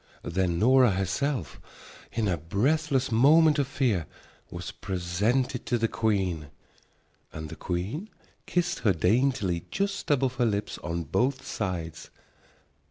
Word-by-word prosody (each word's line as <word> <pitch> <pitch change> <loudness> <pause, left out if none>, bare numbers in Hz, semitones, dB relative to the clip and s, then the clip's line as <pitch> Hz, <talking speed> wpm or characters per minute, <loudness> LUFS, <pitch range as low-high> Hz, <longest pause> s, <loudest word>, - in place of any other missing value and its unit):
Then 85 0 0
Nora 125 +4 +5
herself, 95 - -2 0.5
in 110 -2 -1
a 90 - +2
breathless 130 - 0
moment 150 +6 +5
of 140 - +1
fear, 120 - 0 0.4
was 85 0 -6
presented 105 +8 -1
to 120 - +2
the 115 0 +1
queen, 95 -9 -1 0.8
and 80 0 -7
the - - -7
queen 100 - -4 0.4
kissed 175 -1 0
her 105 -4 +3
daintily 95 - +1
just 200 0 -2
above 135 -3 +1
her 120 - +3
lips 105 -1 -2
on 85 0 -3
both 130 - 0
sides. 90 -6 -4
110 Hz, 125 wpm, -27 LUFS, 90-135 Hz, 0.8 s, Nora